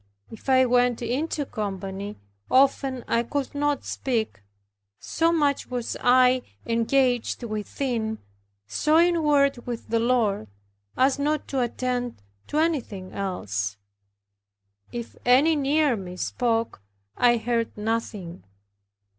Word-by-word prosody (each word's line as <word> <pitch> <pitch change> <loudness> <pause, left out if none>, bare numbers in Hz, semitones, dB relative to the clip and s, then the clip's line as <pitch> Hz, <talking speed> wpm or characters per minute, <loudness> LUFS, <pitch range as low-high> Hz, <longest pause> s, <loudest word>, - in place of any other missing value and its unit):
If 225 +4 -8
I 260 0 +6
went 245 -1 +2
into 285 +5 -1
company, 200 -2 -5 0.3
often 265 -1 +2
I 230 - +2
could 275 +3 -3
not 290 -1 0
speak; 225 - -2 0.6
so 330 0 +1
much 290 -4 +1
was 245 -2 -3
I 255 0 +5 0.2
engaged 245 +1 +1
within, 220 +1 -2 0.5
so 305 - +2
inward 300 -6 +3
with 240 -2 -5
the 230 - +2
Lord, 225 - +1 0.5
as 265 +2 +3
not 300 +1 0
to 270 -2 0
attend 245 - -2 0.2
to 295 - -3
anything 260 - -1
else. 105 - -3 1.1
If 235 -1 -6
any 275 +6 +5
near 290 -1 +2
me 185 -3 -7
spoke, 230 - -1 0.3
I 240 -1 +4
heard 230 -1 -1
nothing. 210 - -3
245 Hz, 115 wpm, -25 LUFS, 220-275 Hz, 1.1 s, I